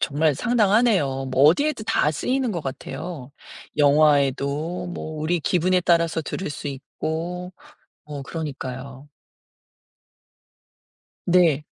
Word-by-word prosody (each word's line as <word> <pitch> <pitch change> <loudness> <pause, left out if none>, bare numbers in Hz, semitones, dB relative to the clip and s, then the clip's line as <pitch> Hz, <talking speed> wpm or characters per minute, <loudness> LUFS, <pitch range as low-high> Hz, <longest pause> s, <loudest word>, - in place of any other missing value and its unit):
정말 150 0 +1
상당하네요. 205 - +2
뭐 130 +1 +2
어디에도 225 - +3
다 150 - +2
쓰이는 255 - -1
것 175 -5 -3
같아요. 140 +1 -6 0.5
영화에도 145 +3 +2
뭐 155 -3 -6
우리 170 +3 0
기분에 180 +3 +2
따라서 170 -2 +2
들을 185 +3 -4
수 145 - -6
있고. 165 +6 -5 0.5
어 145 -2 -7
그러니까요. 135 -3 -6 2.2
네. 170 -5 +3
155 Hz, 230 characters per minute, -23 LUFS, 140-180 Hz, 2.2 s, 어디에도